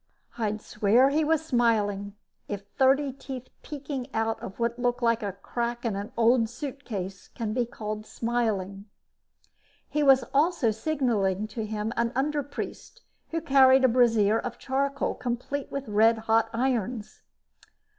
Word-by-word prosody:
I'd 215 -2 -2
swear 230 +6 +3
he 310 +2 +2
was 320 0 +1
smiling, 210 -6 +1 0.3
if 200 -1 -5
thirty 270 +1 +3
teeth 260 -2 -8
peeking 280 -3 -5
out 225 0 0
of 190 - -8
what 235 +1 -1
looked 245 0 0
like 230 -1 +3
a 200 -2 -3
crack 240 +4 -4
in 220 -4 0
an 205 +4 -5
old 230 0 +4
suitcase 240 -8 -6
can 220 -3 -4
be 240 0 0
called 215 -2 -6
smiling. 210 -5 -2 1.0
He 300 - -1
was 270 -2 +6
also 290 -5 +3
signaling 215 -7 0
to 220 0 -4
him 215 +1 -3
an 235 0 +2
underpriest 290 - -3 0.3
who 330 0 -2
carried 265 -3 +6
a - - +7
brazier 225 -3 +3
of 240 0 -5
charcoal 275 +1 -1
complete 250 +3 -4
with 275 -2 -4
red 220 +2 +4
hot 225 0 +2
irons. 235 -2 -2
235 Hz, 145 wpm, -27 LUFS, 215-265 Hz, 1.0 s, a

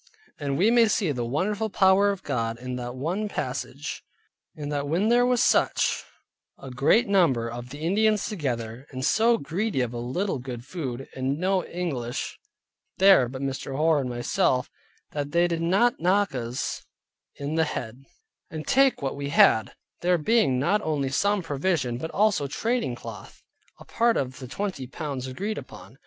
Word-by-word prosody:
And 140 -2 -2
we 205 +6 +4
may 235 -1 +5
see 205 -6 +1
the 125 -3 -2
wonderful 195 - -1
power 195 +1 +4
of 200 -1 -3
God, 115 -1 -2
in 125 +1 -5
that 120 0 -5
one 180 +11 -2
passage, - - -4 0.5
in 150 -2 -5
that 145 -1 -2
when 180 +9 +1
there 245 +1 +4
was 250 0 +3
such - - +2 0.5
a 135 - -9
great 145 - +3
number 165 -13 +3
of 120 +1 -7
the 145 - -8
Indians 210 +5 +2
together, 125 - -4
and 130 -1 -4
so 230 +1 +4
greedy 185 +2 -2
of 125 -1 -2
a 120 - -4
little 140 +8 -2
good 120 -1 -7
food, 135 -6 -5
and 130 +2 -1
no 185 +1 +1
English 135 -9 -4 0.6
there 190 -11 +6
but 130 +1 -6
Mr. 135 0 -4
Hoar 155 0 +3
and 130 - -3
myself, 120 +1 0 0.4
that 145 0 -4
there 170 0 +4
they - - +3
did - - -5
not 195 +9 +2
knock 195 +2 +2
us 125 0 -3 0.5
in 145 +2 -4
the 160 0 +2
head, 125 -2 -5 0.5
and 155 -1 -6
take 270 - +3
what 135 - -2
we 140 0 -4
had, 110 -7 +4 0.2
there 180 0 +2
being 185 - +2
not 200 +11 +2
only 145 -5 -1
some 200 +7 +1
provision, 140 -5 -1
but 160 - -4
also 205 -8 +2
trading 225 - -1
cloth, - - -10 0.4
a - - -13
part 235 0 +2
of 130 -1 -3
the 130 - -7
twenty 165 -3 -4
pounds 135 -1 -5
agreed 200 +11 -3
upon. 110 -1 -13
150 Hz, 175 wpm, -26 LUFS, 130-195 Hz, 0.6 s, there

